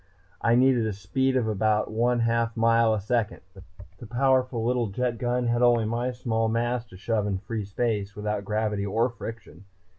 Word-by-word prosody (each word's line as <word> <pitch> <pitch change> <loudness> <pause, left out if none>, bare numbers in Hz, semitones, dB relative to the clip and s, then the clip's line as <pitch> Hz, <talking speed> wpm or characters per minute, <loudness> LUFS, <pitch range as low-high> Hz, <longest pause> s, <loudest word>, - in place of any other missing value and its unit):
I 115 0 +3
needed 125 -2 +3
a 110 - -2
speed 130 +7 -1
of 120 -3 0
about 110 0 +1
one 120 +2 +1
half 115 0 0
mile 115 0 +4
a - - -2
second. 105 +1 -1 0.6
The 120 - -9
powerful 130 -1 +1
little 120 -1 +1
jet 120 +3 -2
gun 125 +1 0
had 120 0 +1
only 120 -2 +4
my 120 +3 -1
small 115 -2 -1
mass 120 +1 0
to 90 - -13
shove 105 +1 -1
in 100 -2 -1
free 105 +2 -5
space, 105 -1 -2
without 105 -1 -3
gravity 105 0 -1
or 115 +5 0
friction. 115 -5 -9
115 Hz, 180 wpm, -26 LUFS, 105-120 Hz, 0.6 s, mile